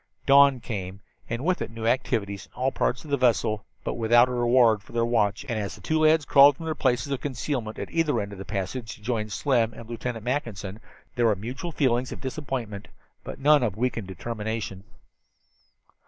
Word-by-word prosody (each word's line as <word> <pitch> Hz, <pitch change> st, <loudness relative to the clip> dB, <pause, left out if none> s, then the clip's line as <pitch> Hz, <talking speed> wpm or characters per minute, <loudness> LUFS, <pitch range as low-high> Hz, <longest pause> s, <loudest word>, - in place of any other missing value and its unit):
Dawn 140 Hz, -1 st, +6 dB
came, 95 Hz, -4 st, -5 dB, 0.3 s
and 115 Hz, +5 st, -3 dB
with 185 Hz, 0 st, +1 dB
it -, -, -3 dB
new 115 Hz, 0 st, -6 dB
activities 105 Hz, -6 st, -1 dB
in -, -, -34 dB
all 130 Hz, +1 st, 0 dB
parts 125 Hz, +2 st, -1 dB
of 150 Hz, -, -9 dB
the 140 Hz, -, +3 dB
vessel, 115 Hz, -4 st, +1 dB, 0.2 s
but -, -, -2 dB
without 120 Hz, +2 st, +4 dB
a -, -, -3 dB
reward 120 Hz, -3 st, +4 dB
for 110 Hz, -, -17 dB
their 115 Hz, 0 st, +1 dB
watch, 115 Hz, +1 st, +1 dB
and 115 Hz, -4 st, -2 dB
as 100 Hz, -2 st, -4 dB
the -, -, -15 dB
two 160 Hz, 0 st, 0 dB
lads 155 Hz, -1 st, +4 dB
crawled 140 Hz, 0 st, +7 dB
from 165 Hz, -, -8 dB
their 160 Hz, -, -1 dB
places 130 Hz, -1 st, 0 dB
of 135 Hz, -, -2 dB
concealment 125 Hz, -4 st, -3 dB
at -, -, -6 dB
either 165 Hz, -3 st, +1 dB
end 100 Hz, 0 st, -4 dB
of 100 Hz, -, -9 dB
the -, -, -5 dB
passage, 105 Hz, +4 st, -4 dB
to 105 Hz, -, -20 dB
join 110 Hz, -2 st, -2 dB
Slim 115 Hz, 0 st, +1 dB
and 115 Hz, -, -10 dB
Lieutenant 115 Hz, -1 st, -5 dB
Mackinson, 110 Hz, -7 st, -3 dB, 0.4 s
there 120 Hz, -2 st, +3 dB
were 110 Hz, -, +3 dB
mutual 125 Hz, -, -6 dB
feelings 130 Hz, -4 st, +1 dB
of -, -, -7 dB
disappointment, 130 Hz, -7 st, -5 dB, 0.4 s
but -, -, -7 dB
none 145 Hz, +1 st, +5 dB
of 105 Hz, -5 st, -1 dB
weakened 115 Hz, -4 st, -1 dB
determination. 105 Hz, 0 st, -5 dB
120 Hz, 200 wpm, -26 LUFS, 110-135 Hz, 0.4 s, crawled